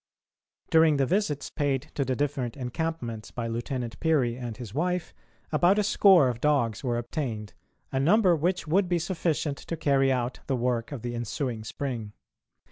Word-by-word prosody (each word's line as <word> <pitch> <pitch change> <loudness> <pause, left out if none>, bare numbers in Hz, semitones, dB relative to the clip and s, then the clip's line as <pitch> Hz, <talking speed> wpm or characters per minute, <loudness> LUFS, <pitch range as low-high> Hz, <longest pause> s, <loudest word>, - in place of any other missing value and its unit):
During 160 -2 +5
the 135 - +3
visits 155 -4 -1
paid 140 -4 -1
to 140 - 0
the 130 -1 -1
different 135 -3 -2
encampments 125 -4 -4
by 120 - -4
Lieutenant 120 0 -4
Peary 140 -8 +2
and 120 -3 -6
his 115 -5 -8
wife, 180 +4 -1 0.4
about 175 +6 +4
a 210 - +3
score 190 -7 +6
of 120 -1 -3
dogs 120 -8 +1
were 120 -2 0
obtained, 120 -4 -4 0.4
a 135 - 0
number 180 +5 +4
which 175 +4 0
would 180 +4 +2
be 175 - +2
sufficient 165 -4 -1
to 165 - -5
carry 135 -2 +3
out 125 -1 -1
the 135 - +1
work 120 -1 -1
of 130 -5 -6
the 120 0 -3
ensuing 120 0 -3
spring. 115 -3 -4
135 Hz, 170 wpm, -27 LUFS, 120-160 Hz, 0.4 s, score